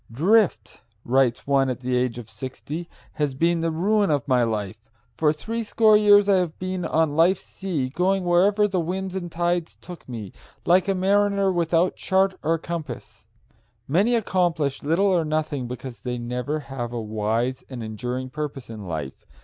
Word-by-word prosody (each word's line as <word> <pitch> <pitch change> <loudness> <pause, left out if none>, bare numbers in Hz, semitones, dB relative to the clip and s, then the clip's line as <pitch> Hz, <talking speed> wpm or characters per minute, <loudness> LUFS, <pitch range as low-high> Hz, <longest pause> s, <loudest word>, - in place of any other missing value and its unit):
"Drift," 190 - +2 0.2
writes 125 -1 +2
one 135 -1 +2
at 125 -1 -4
the 125 0 -1
age 125 -1 0
of 120 -3 -8
sixty, 130 +9 -7 0.2
"has 145 -3 -1
been 170 +4 +2
the 165 - 0
ruin 200 +5 +1
of 145 -1 0
my 130 -2 +3
life. 110 -1 -3 0.3
For 150 -2 +3
threescore 220 +5 +2
years 205 -1 +6
I 200 -2 +5
have 175 -3 -1
been 185 -1 -3
on 160 -2 +1
life's 175 +4 +3
sea, 165 -10 -3
going 185 +6 +1
wherever 200 +4 +4
the 190 -2 -1
winds 185 +3 -3
and 175 -3 -4
tides 175 0 -1
took 175 -6 -12
me, 110 -6 -7 0.3
like 180 +2 +4
a 195 - +1
mariner 200 +1 +2
without 170 0 +1
chart 190 0 +2
or 165 +2 +1
compass." 160 -6 -7 0.6
Many 200 - +3
accomplish 175 - 0
little 165 +7 +1
or 185 -4 +3
nothing 155 -4 -2
because 125 -2 -8
they 125 +2 -3
never 125 +5 -3
have 125 -4 -5
a 120 - -2
wise 110 +4 -1
and 125 -3 -6
enduring 125 +4 -4
purpose 145 -4 -5
in 105 -4 -8
life. 75 -5 -6
155 Hz, 170 wpm, -24 LUFS, 125-185 Hz, 0.6 s, years